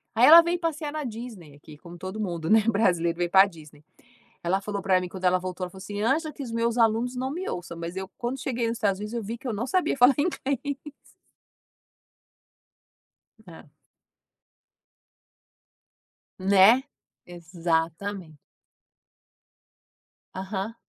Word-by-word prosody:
Aí 240 +3 +6
ela 335 +2 +10
veio 340 +1 -1
passear 315 -3 -3
na 305 -1 -3
Disney 220 - -8
aqui, 150 +1 -14
como 175 +2 -12
todo 185 +4 -7
mundo, 170 -5 -3
né, 220 0 +6
brasileiro 175 -6 +1
veio 175 -1 -1
pra 190 +1 +7
Disney. 155 -5 -13 0.6
Ela 185 +3 +1
falou 200 0 -4
pra 185 -1 +3
mim 180 - -4
quando 185 +1 -10
ela 180 0 +4
voltou, 185 0 -5
ela - - -8
falou 190 - -15
assim: 205 +1 -6
"Angela, 305 +6 0
que 280 - -9
os 240 -4 -6
meus 230 +1 0
alunos 230 +3 +2
não 260 +2 -3
me 360 +5 -5
ouçam, 170 -1 -6
mas 170 +2 -6
eu 190 0 -5
quando 245 +3 -3
cheguei 240 -3 -2
nos 230 0 -2
Estados 200 -3 0
Unidos 210 +2 -6
eu 235 - -2
vi 230 +4 -5
que 260 - -9
eu 235 - -2
não 230 +5 -3
sabia 365 -1 +1
falar 250 +1 +5
inglês". 285 -2 -2 2.6
É. 165 -3 -13 2.7
Né, 200 +7 +5 0.4
Exatamente. 170 0 -3 2.0
Aham. 195 +3 -4
205 Hz, 150 wpm, -26 LUFS, 180-245 Hz, 2.7 s, ela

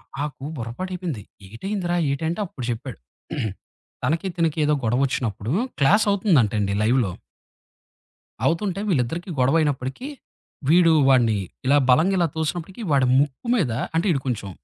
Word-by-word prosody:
ఆకు - - -30 0.3
నాకు 145 - -4
బుర్రపాడైపోయింది. 165 - -5 0.3
ఏటయిందిరా 175 - -3
ఏటంటే 160 +6 -2
అప్పుడు 135 -8 -8
జెప్పాడు. 120 - -5 1.1
తనకి, 165 +8 0
తినకి 165 -2 0
ఏదో 150 - +3
గొడవ 120 +5 +2
ఒచ్చినప్పుడు 115 -3 -3 0.3
క్లాసవుతుందంటండి 145 - +3
లైవ్‌లో. 115 -4 +2 1.3
అవుతుంటే, 185 +3 0
వీళ్ళిద్దరికి 165 +3 -1
గొడవయినప్పటికి. 135 - +1 0.6
వీడు 165 0 +6 0.2
వాడిని 120 -5 +4 0.3
ఇలా 140 - +5
బలంగా 165 +10 +4
ఇలా 170 - +3
తోసినప్పటికి 170 +6 -3
వాడి 135 -3 +4
ముక్కు 145 - -2
మీద 170 - +1 0.2
అంటే 165 +5 +1
ఈడు 140 - +1
కొంచెం. 110 -6 -3
145 Hz, 120 wpm, -23 LUFS, 125-175 Hz, 1.3 s, వీడు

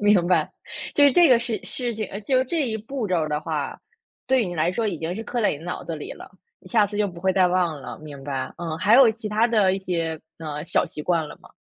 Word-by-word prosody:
明 205 -4 +4
白。 175 -4 +2 0.4
就 290 - +6
是 280 - +6
这 350 -2 +6
个 250 -3 +6
事 235 -2 -3
事 245 -2 -3
情， 215 -2 -3 0.2
就 260 -1 +3
这 300 +1 -1
一 220 - -1
步 225 +2 -4
骤 185 - +1
儿 155 - -2
的 150 0 -1
话， 155 -3 -3 0.5
对 260 -5 +3
你 175 - -5
来 165 +3 +1
说 225 +2 -1
已 180 -6 -2
经 165 +3 -3
是 220 - -5
刻 240 0 -2
在 210 - +4
你 145 - -4
脑 175 +4 -5
子 165 - -4
里 150 - -7
了， - - -12 0.3
你 185 - -16
下 210 0 +4
次 205 - -7
就 210 0 +2
不 175 -2 -10
会 190 0 +2
再 185 -1 +4
忘 175 -5 0
了。 125 - -8
明 145 -3 -10
白。 135 -2 -3
嗯， 165 -2 -4
还 210 +4 +4
有 255 -2 +8
其 220 -1 -6
它 215 +2 +3
的 210 -5 +3
一 - - -2
些， 165 -4 -2 0.2
呃， 150 -2 -5
小 - - +1
习 150 - -7
惯 165 -2 +1
了 - - -10
吗？ - - -17
185 Hz, 290 characters per minute, -24 LUFS, 160-225 Hz, 0.5 s, 有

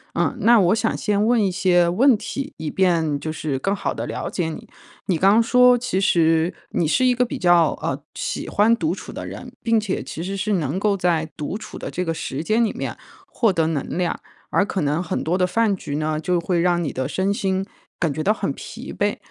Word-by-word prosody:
嗯。 - - 0
那 235 +1 +6
我 180 +4 +3
想 225 0 0
先 210 0 +1
问 235 -3 +3
一 190 - 0
些 180 -2 +3
问 235 +7 +4
题， 275 +6 -5
以 155 -1 -4
便 165 -6 +1
就 155 +2 -4
是 145 -4 -3
更 195 +7 0
好 - - -2
地 - - -4
了 - - -4
解 175 -3 -2
你。 155 - -8 0.4
你 180 - +1
刚 200 +6 +5
说， 250 +1 +5
其 235 -6 -1
实 165 -1 +3 0.2
你 165 - 0
是 255 - +2
一 250 - +4
个 250 0 +1
比 - - -5
较， 175 -3 +4
呃， - - -2
喜 - - -3
欢 215 +3 +4
独 315 +7 -1
处 - - -9
的 - - -6
人， - - -8
并 230 -1 +3
且 205 -3 -2
其 165 - -6
实 195 +2 -4
是 205 +2 -1
能 165 -1 -1
够 205 0 +2
在 170 -3 0
独 150 +6 -3
处 215 -1 -9
的 - - -6
这 180 - -2
个 165 - -1
时 145 -3 -4
间 220 +5 +2
里 220 - +1
面， - - -5 0.3
获 225 -4 +1
得 165 -3 +1
能 155 -4 -2
量， 180 -2 -1 0.3
而 200 - +2
可 195 - -2
能 150 +3 0
很 185 - -3
多 175 +3 0
的 180 - +3
饭 215 +2 +1
局 145 -6 -6
呢， 155 0 -1
就 175 +2 0
会 170 0 0
让 175 0 +2
你 145 - -2
的 130 0 -3
身 190 +6 0
心 190 -1 -1 0.3
感 165 -4 +1
觉 155 - -3
到 210 +5 +3
很 - - -2
疲 - - -9
惫， - - 0
185 Hz, 250 characters per minute, -22 LUFS, 165-215 Hz, 0.4 s, 那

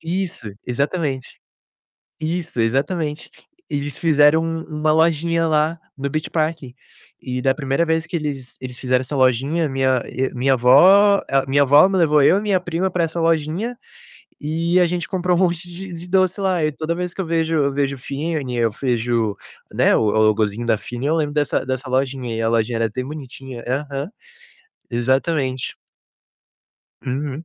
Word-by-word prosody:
Isso, 170 - -4
exatamente. 140 +1 -2 0.8
Isso, 160 -5 -3
exatamente. 150 +6 -1 0.4
Eles 145 -1 -3
fizeram 155 0 +4
um 165 0 -3 0.2
uma 155 0 +3
lojinha 165 +1 +2
lá 155 +2 +1 0.2
no 140 +1 -3
Beach 155 +1 -3
Park, 160 0 0 0.6
e 125 -1 -4
da 135 0 +2
primeira 140 +2 0
vez 160 0 0
que 180 - -12
eles 140 -5 -5
eles 125 -1 -7
fizeram 130 -1 +1
essa 135 +3 -4
lojinha, 135 +5 +2
minha 130 -2 +1
e 130 +1 -2
minha 130 +2 +2
vó 190 +12 +6
a 135 0 +2
minha 140 +1 +4
vó 145 +6 +6
me 195 - -1
levou 150 -4 +4
eu 180 +7 +5
e - - -2
minha 200 -3 +1
prima 180 +1 -2
para 175 -2 0
essa 165 +1 -3
lojinha, 165 +9 0 0.6
e 165 +4 +1
a 180 - +5
gente 175 0 -3
comprou 180 -2 0
um 175 - +1
monte 175 -1 0
de 185 +1 -8
de 170 +1 -8
doce 185 +1 +2
lá. 185 -4 +1
E 155 - 0
toda 160 +3 -3
vez 180 0 -4
que - - -5
eu 180 - -2
vejo 165 0 0
eu 140 -2 +2
vejo 140 0 -1
Fini, 140 -2 -3
eu 115 -1 +2
vejo, 120 -3 -1 0.4
né, - - +3
o - - +3
o 110 - +2 0.2
logozinho 110 +2 0
da 115 - +3
Fini, 120 +6 -6
eu 155 - +2
lembro 150 -2 -1
dessa 145 -2 0
dessa 130 +1 -4
lojinha 130 -2 -1
e 115 - -2
a 115 - +1
lojinha 115 0 +1
era 115 - +2
até 120 +4 -4
bonitinha. 135 -3 -8
Aham. 140 +4 -3 0.8
Exatamente. 130 +2 0 1.3
Uhum. 135 +4 -4
150 Hz, 175 wpm, -20 LUFS, 130-165 Hz, 1.3 s, vó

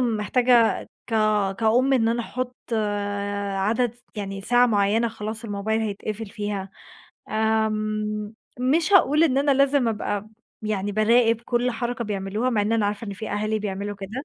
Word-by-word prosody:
محتاجة 235 +1 +2 0.2
كا 215 -3 +2
كأم 230 +6 +2
إن 230 -4 +3
أنا 235 +1 0
أحط 250 +1 -4 1.1
عدد 230 +3 +1 0.2
يعني 195 -1 -4
ساعة 245 +4 +4
معيّنة 215 +1 +2
خلاص 220 +1 -6
الموبايل 220 +1 -1
هيتقفل 215 +1 -4
فيها، 200 -1 -4 0.6
آمم، 215 -1 -1 0.3
مش 315 +9 +2
هاقول 320 -4 +5
إن 270 -4 +2
أنا 285 +1 +2
لازم 275 -2 +3
أبقى 210 -1 -3 0.3
يعني 205 -1 -2
باراقب 230 +2 +3
كل 240 +1 0
حركة 240 +1 -3
بيعملوها، 205 +4 -2
مع 220 -4 +1
إن 210 +2 0
أنا 220 -2 +2
عارفة 205 +2 -3
إن 200 - -4
في 205 +3 -6
أهالي 215 +1 -1
بيعملوا 205 0 -4
كده، 210 +8 -6
220 Hz, 145 wpm, -24 LUFS, 205-240 Hz, 1.1 s, هاقول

